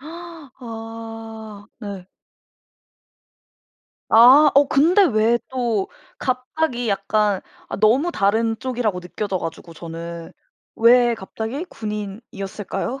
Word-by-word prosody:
아 225 Hz, -9 st, -9 dB
네. 200 Hz, -4 st, -7 dB, 2.0 s
아. 260 Hz, +7 st, +8 dB
어 280 Hz, +1 st, +7 dB
근데 335 Hz, +9 st, +4 dB
왜 230 Hz, -, +3 dB
또 235 Hz, -6 st, -1 dB, 0.3 s
갑자기 255 Hz, -1 st, -2 dB
약간 200 Hz, 0 st, +1 dB, 0.3 s
아 -, -, -4 dB
너무 235 Hz, -, +3 dB
다른 225 Hz, -, +1 dB
쪽이라고 240 Hz, -7 st, -2 dB
느껴져 190 Hz, +2 st, -3 dB
가지고 165 Hz, 0 st, -7 dB
저는. 165 Hz, 0 st, -8 dB, 0.5 s
왜 240 Hz, +1 st, +6 dB
갑자기 225 Hz, -, -5 dB
군인이었을까요? 210 Hz, -, -5 dB
225 Hz, 190 characters per minute, -21 LUFS, 200-255 Hz, 2.0 s, 아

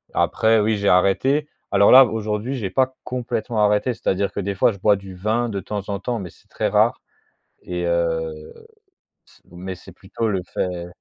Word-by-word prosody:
Après 110 Hz, 0 st, +2 dB
oui, 110 Hz, 0 st, +1 dB
j'ai 100 Hz, 0 st, +1 dB
arrêté. 130 Hz, +11 st, +2 dB, 0.2 s
Alors 100 Hz, -, +4 dB
là, 130 Hz, +1 st, +10 dB
aujourd'hui, 110 Hz, +3 st, -3 dB
j'ai 100 Hz, -7 st, -4 dB
pas 130 Hz, +2 st, +1 dB
complètement 120 Hz, -3 st, -2 dB
arrêté, 105 Hz, +4 st, +2 dB
c'est-à-dire 100 Hz, -4 st, -1 dB
que -, -, -5 dB
des 100 Hz, 0 st, -3 dB
fois 115 Hz, -, +3 dB
je 100 Hz, -, -11 dB
bois 105 Hz, +1 st, +4 dB
du 95 Hz, -1 st, -10 dB
vin 110 Hz, +6 st, -1 dB
de 100 Hz, -2 st, -3 dB
temps 100 Hz, +1 st, -5 dB
en 100 Hz, -1 st, -2 dB
temps, 120 Hz, +2 st, -3 dB
mais 95 Hz, -4 st, -7 dB
c'est -, -, -25 dB
très -, -, -1 dB
rare -, -, +2 dB, 0.6 s
et 90 Hz, -1 st, -4 dB
heu, 80 Hz, -2 st, -2 dB, 0.7 s
c'est -, -, -24 dB
mais 95 Hz, +2 st, -6 dB
c'est 95 Hz, +1 st, -14 dB
plutôt 100 Hz, +5 st, -4 dB
le 95 Hz, -2 st, -1 dB
fait 90 Hz, -2 st, -2 dB
100 Hz, 190 wpm, -21 LUFS, 95-115 Hz, 0.7 s, là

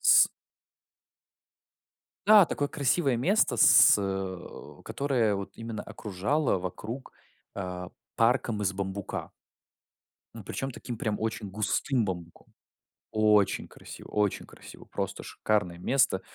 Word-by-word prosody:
С -, -, +7 dB, 2.0 s
Да, 210 Hz, -2 st, +8 dB
такое 145 Hz, -3 st, -2 dB
красивое 140 Hz, -2 st, +1 dB
место, 145 Hz, -, +2 dB
с, -, -, +7 dB
э, 95 Hz, -2 st, -5 dB
которое 125 Hz, -7 st, 0 dB
вот 100 Hz, 0 st, -5 dB
именно 115 Hz, -2 st, -6 dB
окружало 110 Hz, +6 st, -1 dB
вокруг, 105 Hz, +8 st, -6 dB, 0.4 s
а, 90 Hz, -2 st, -5 dB, 0.3 s
парком 115 Hz, -2 st, +2 dB
из 95 Hz, -1 st, +1 dB
бамбука. 100 Hz, 0 st, -5 dB, 1.0 s
И -, -, -9 dB
причём 135 Hz, -, -4 dB
таким 120 Hz, -1 st, -7 dB
прям 110 Hz, -3 st, -2 dB
очень 110 Hz, -2 st, -3 dB
густым 110 Hz, +4 st, 0 dB
бамбуком. 85 Hz, -3 st, -7 dB, 0.6 s
Очень 105 Hz, -2 st, +3 dB
красиво -, -, -12 dB
очень 105 Hz, -2 st, 0 dB
красиво, -, -, -14 dB
просто -, -, -4 dB
шикарное 90 Hz, -5 st, -1 dB
место. 130 Hz, -5 st, +2 dB
105 Hz, 110 wpm, -28 LUFS, 95-125 Hz, 2.0 s, Да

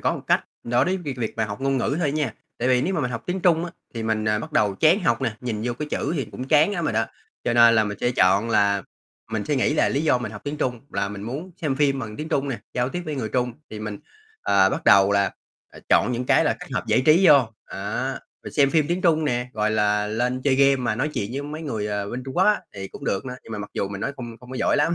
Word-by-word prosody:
có -, -, +1 dB
một -, -, -6 dB
cách -, -, +2 dB, 0.2 s
đối 120 Hz, +1 st, +2 dB
với 185 Hz, +1 st, 0 dB
việc 145 Hz, -8 st, -5 dB
việc 115 Hz, -3 st, -3 dB
mà 110 Hz, -, +1 dB
học 100 Hz, +1 st, -6 dB
ngôn 135 Hz, 0 st, +1 dB
ngữ 135 Hz, +3 st, 0 dB
thôi 150 Hz, -5 st, +1 dB
nha. 145 Hz, -7 st, -1 dB, 0.2 s
Tại 125 Hz, -, 0 dB
vì 125 Hz, 0 st, +3 dB
nếu 190 Hz, +3 st, 0 dB
mà 165 Hz, -, 0 dB
mình 125 Hz, -3 st, -1 dB
học 120 Hz, -2 st, -4 dB
tiếng 180 Hz, +1 st, -2 dB
Trung 170 Hz, -2 st, +3 dB
á, 175 Hz, -, -6 dB, 0.2 s
thì 115 Hz, -, -3 dB
mình, 110 Hz, -1 st, 0 dB
à, 105 Hz, 0 st, +2 dB
bắt 155 Hz, +8 st, -7 dB
đầu 105 Hz, -8 st, +2 dB
chán 160 Hz, -, +4 dB
học 165 Hz, -, +1 dB
nè, 120 Hz, -4 st, 0 dB
nhìn 115 Hz, -4 st, -3 dB
vô 120 Hz, -, 0 dB
cái 150 Hz, +5 st, -5 dB
chữ -, -, -1 dB
thì 140 Hz, -, -1 dB
cũng 125 Hz, +4 st, -8 dB
chán 155 Hz, +6 st, +4 dB
lắm 175 Hz, -4 st, -2 dB
rồi -, -, 0 dB
đó. 110 Hz, +1 st, +2 dB, 0.4 s
Cho 120 Hz, -, +1 dB
nên 115 Hz, -1 st, +7 dB
là 110 Hz, -1 st, +4 dB
mình 105 Hz, -1 st, -5 dB
sẽ 120 Hz, -, +2 dB
chọn 100 Hz, 0 st, +3 dB
là 100 Hz, -2 st, +3 dB, 0.5 s
mình 110 Hz, -2 st, -1 dB
suy 145 Hz, -, 0 dB
nghĩ 135 Hz, +3 st, +2 dB
là -, -, +3 dB
lý 140 Hz, -, 0 dB
do 145 Hz, -5 st, +3 dB
mình 115 Hz, -4 st, -5 dB
học 105 Hz, -, -8 dB
tiếng 145 Hz, +1 st, -3 dB
Trung 125 Hz, -5 st, -2 dB
là 100 Hz, 0 st, -1 dB
mình 100 Hz, -1 st, -7 dB
muốn 140 Hz, -, -5 dB
xem 145 Hz, -5 st, -1 dB
phim 140 Hz, -1 st, +2 dB
bằng 110 Hz, -4 st, -6 dB
tiếng 155 Hz, -, -5 dB
Trung 140 Hz, -4 st, 0 dB
nè, 130 Hz, -4 st, -3 dB, 0.2 s
giao 125 Hz, 0 st, +1 dB
tiếp 175 Hz, +6 st, -4 dB
với 155 Hz, -, -3 dB
người 120 Hz, -6 st, -3 dB
Trung 125 Hz, +2 st, 0 dB, 0.2 s
thì 110 Hz, -, -7 dB
mình, 105 Hz, -1 st, -5 dB, 0.4 s
ờ, 95 Hz, -1 st, +4 dB
bắt -, -, -3 dB
đầu 100 Hz, 0 st, +6 dB
là 100 Hz, -1 st, +2 dB, 0.6 s
chọn 125 Hz, -, +4 dB
những 125 Hz, +1 st, -2 dB
cái -, -, +4 dB
là -, -, +1 dB
kết -, -, -8 dB
hợp -, -, -2 dB
giải -, -, +3 dB
trí 170 Hz, +5 st, +6 dB
vô, 140 Hz, -7 st, +6 dB, 0.2 s
á. 100 Hz, +7 st, -3 dB, 0.3 s
Rồi -, -, -7 dB
xem 140 Hz, -2 st, +3 dB
phim 155 Hz, -1 st, +3 dB
tiếng 175 Hz, +2 st, 0 dB
Trung 160 Hz, -3 st, +3 dB
nè, 125 Hz, -3 st, -1 dB
gọi 110 Hz, -1 st, 0 dB
là, 105 Hz, -1 st, +2 dB
lên 125 Hz, +4 st, -1 dB
chơi 140 Hz, -1 st, +3 dB
game 140 Hz, 0 st, +5 dB
mà 125 Hz, -4 st, -1 dB
nói 135 Hz, +7 st, -1 dB
chuyện 105 Hz, -8 st, -3 dB
với 140 Hz, +2 st, -3 dB
mấy 150 Hz, +2 st, -6 dB
người, 110 Hz, -9 st, -3 dB
ờ, 105 Hz, -1 st, -3 dB
bên 125 Hz, +1 st, -4 dB
Trung 130 Hz, -, -7 dB
Quốc 185 Hz, -, +4 dB
á, 210 Hz, 0 st, +3 dB
thì 95 Hz, -1 st, -6 dB
cũng -, -, -10 dB
được 95 Hz, -, -1 dB
nữa, 125 Hz, 0 st, -5 dB
nhưng 115 Hz, -, -9 dB
mà 110 Hz, -, -4 dB
mặc 105 Hz, -, -7 dB
dù 100 Hz, -, -1 dB
mình 100 Hz, 0 st, -6 dB
nói 140 Hz, -, -2 dB
không 120 Hz, -3 st, -7 dB
không 125 Hz, -, -14 dB
có 130 Hz, -, -5 dB
giỏi -, -, +2 dB
lắm. 165 Hz, +4 st, +2 dB
125 Hz, 300 wpm, -24 LUFS, 110-145 Hz, 0.6 s, nên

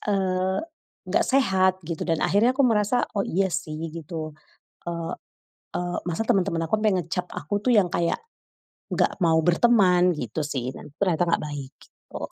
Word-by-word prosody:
eee, 190 Hz, -1 st, +1 dB, 0.5 s
nggak -, -, +2 dB
sehat 190 Hz, -8 st, +3 dB
gitu 165 Hz, -2 st, -4 dB
dan 165 Hz, -, +1 dB
akhirnya 225 Hz, +6 st, +3 dB
aku 280 Hz, -, -2 dB
merasa, 220 Hz, +1 st, +2 dB
oh 195 Hz, -, +1 dB
iya 190 Hz, +3 st, +1 dB
sih, 155 Hz, 0 st, -3 dB, 0.2 s
gitu. 160 Hz, -1 st, -6 dB, 0.6 s
Eee 170 Hz, -1 st, -3 dB, 0.7 s
eee, 175 Hz, 0 st, -3 dB
masa 175 Hz, +6 st, -1 dB
temen-temen 180 Hz, -4 st, +2 dB
aku 220 Hz, -, +2 dB
sampai 215 Hz, 0 st, +3 dB
ngecap 180 Hz, +1 st, -2 dB
aku 180 Hz, +4 st, -2 dB
tuh 255 Hz, -, +3 dB
yang 200 Hz, -4 st, +5 dB
kayak, 170 Hz, -1 st, 0 dB, 0.7 s
nggak -, -, +1 dB
mau 160 Hz, -1 st, +4 dB
berteman 180 Hz, -1 st, +4 dB
gitu 125 Hz, +3 st, -4 dB
sih 130 Hz, -4 st, -3 dB
dan 150 Hz, -, -11 dB
ternyata 180 Hz, -3 st, +2 dB
nggak 170 Hz, -, +1 dB
baik, 145 Hz, -1 st, -7 dB
gitu. -, -, -13 dB
180 Hz, 160 wpm, -25 LUFS, 160-195 Hz, 0.7 s, yang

